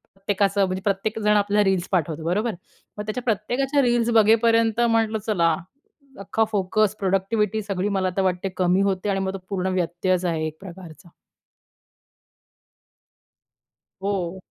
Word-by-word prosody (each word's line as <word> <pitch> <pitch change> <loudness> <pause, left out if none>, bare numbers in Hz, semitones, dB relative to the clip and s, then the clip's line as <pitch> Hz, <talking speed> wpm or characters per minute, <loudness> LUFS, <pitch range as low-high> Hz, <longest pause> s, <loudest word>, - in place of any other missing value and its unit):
प्रत्येकाचं 200 0 +1
म्हणजे 185 0 -3
प्रत्येकजण 210 +2 0
आपल्याला 205 0 +2
रील्स 185 -2 0
पाठवतो 160 -3 -1
बरोबर. 210 +7 0 0.5
मग 210 - -4
त्याच्या 215 +4 -4
प्रत्येकाच्या 250 +6 0
रील्स 240 -1 +2
बघेपर्यंत 225 +1 +4
म्हटलं 225 -2 +2
चला, 170 -6 +2 0.6
अख्खा 200 +3 0
फोकस, 210 +1 +1
प्रोडक्टिव्हिटी 200 +2 0
सगळी 200 -1 -2
मला 190 -2 0
तर - - +3
वाटते 185 +1 -1
कमी 185 +1 +2
होते 195 0 0
आणि 195 -1 0
मग 190 0 -2
तो - - -4
पूर्ण 190 -2 -2
व्यत्ययच 180 +1 0
आहे 160 -2 -1
एक 155 0 -8
प्रकारचा. 180 -2 -12 2.9
हो. 190 -2 -2
195 Hz, 130 wpm, -23 LUFS, 185-215 Hz, 2.9 s, बघेपर्यंत